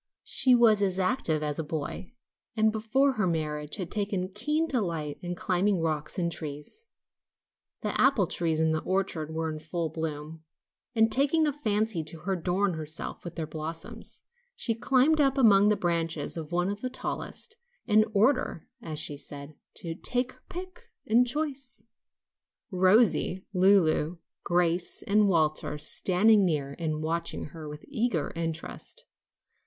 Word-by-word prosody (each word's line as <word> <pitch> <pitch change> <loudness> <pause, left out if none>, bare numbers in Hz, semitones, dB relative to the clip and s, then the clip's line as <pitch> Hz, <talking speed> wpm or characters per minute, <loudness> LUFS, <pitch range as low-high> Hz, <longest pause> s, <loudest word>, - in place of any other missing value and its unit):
She 255 -2 +3
was 225 -4 +5
as 190 -2 +1
active 185 - +1
as 150 0 -2
a - - -1
boy, 155 +5 -5 0.5
and 220 0 +4
before 225 +6 +2
her 215 -7 0
marriage 150 -3 -2
had 185 -4 -5
taken 200 -3 0
keen 300 +11 0
delight 170 - -2
in 175 -1 -4
climbing 185 +2 +1
rocks 155 -2 -2
and 170 -2 0
trees. 155 - -7 0.9
The - - -1
apple 265 -8 +4
trees 165 -2 -1
in 160 0 +3
the 155 0 0
orchard 185 -5 -1
were 160 0 -2
in 155 - -6
full 165 +1 -3
bloom, 155 0 -5 0.5
and 225 0 +4
taking 290 +6 +3
a 295 - +1
fancy 215 - -1
to 155 +1 -4
adorn 190 +1 0
herself 155 0 -5
with 175 -1 -7
their 160 - -3
blossoms, 160 +2 -7 0.3
she 235 - +1
climbed 270 +6 +3
up 275 -1 +2
among 205 -5 +6
the 210 - +4
branches 165 -3 -1
of 160 -2 -6
one 175 +2 +1
of 205 +1 -4
the 255 - -2
tallest, 435 - -5 0.3
in 215 -1 +4
order, 225 - +2
as 160 -8 -5
she 150 -1 0
said, 140 +1 -8 0.2
to 165 -2 -4
"take 245 +8 +1
her - - -22
pick 370 +5 -7 0.2
and 240 +3 +4
choice," 275 -1 -4 0.9
Rosie, 190 0 +3
Lulu, 180 -4 +3 0.3
Gracie 175 0 0
and 210 +1 +4
Walter 155 -4 +1
standing 195 +7 +3
near 145 -6 -1
and 155 -2 -2
watching 165 0 -2
her 155 -1 -9
with 150 0 -9
eager 235 - -1
interest. 165 -1 -5
180 Hz, 150 wpm, -28 LUFS, 160-220 Hz, 0.9 s, among